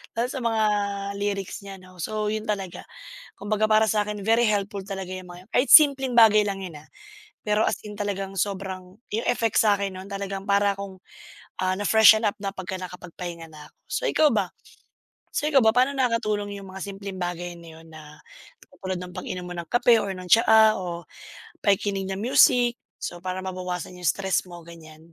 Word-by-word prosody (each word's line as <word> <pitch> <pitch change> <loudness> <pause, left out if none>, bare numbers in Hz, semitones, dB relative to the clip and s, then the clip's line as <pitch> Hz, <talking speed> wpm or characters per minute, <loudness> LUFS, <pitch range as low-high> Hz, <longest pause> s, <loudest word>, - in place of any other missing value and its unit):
Lalo 235 +2 0
sa 265 - -4
mga 225 -2 +1 0.6
lyrics 200 -2 -3
niya 195 -1 -8
'no. 185 -1 -17
So, 215 +4 -2
yun 215 0 -3
talaga. 190 -4 -4 0.6
Kumbaga 215 +1 0
para 215 0 +5
sa 210 -1 +2
'kin, 210 -1 -5
very 230 +1 +4
helpful 200 -1 -1
talaga 190 -2 -6
yung 185 -1 -8
mga 180 +2 -12
yun. - - -44
Kahit 250 +3 +2
simpleng 275 -5 +7
bagay 215 -2 +7
lang 195 -1 -3
yun, 155 -4 -9
ah, - - -22 0.6
pero 210 +1 +1
as - - -1
in 210 - -8
talagang 195 -1 -3
sobrang 190 -1 -4 0.2
yung 225 - -1
effects 230 -2 +2
sa'kin 200 -2 +1
nun 190 +1 -9
talagang 195 0 -4
para 200 0 +2
akong, 195 -1 -8 0.6
ah, 185 0 +1
na-freshen 220 +2 +6
up 200 - -1
na 195 -1 -3
pagka 190 0 -5
nakapagpahinga 180 -2 -8
na 150 -1 -12
ako. - - -38 0.2
So - - -1
ikaw 305 -1 +4
ba? - - +1 0.8
So 300 - -1
ikaw 280 -5 +4
ba, 220 - +5
paano 260 +3 +3
nakakatulong 215 -5 -1
yung 195 - -11
mga 190 - -8
simpleng 200 -1 -7
bagay 175 0 -4
na 170 -1 -13
yun 165 - -16
na 155 -1 -13 0.5
katulad 185 -2 -6
ng 180 0 -9
pag-inom 180 -1 -5
mo 180 - -6
ng 170 - -4
kape 240 -1 +4
or 200 - -3
ng 185 -1 -9
tsaa 220 +1 +6
o 175 -3 -6 0.6
pakikinig 200 -1 +1
ng 190 - -4
music 245 +1 +4 0.2
so 175 0 -6
para 185 0 -3
mabawasan 180 -1 -5
yung 180 - -12
stress 190 +6 +1
mo, 175 0 -9
ganiyan? 160 -2 -13
195 Hz, 190 wpm, -25 LUFS, 185-215 Hz, 0.8 s, simpleng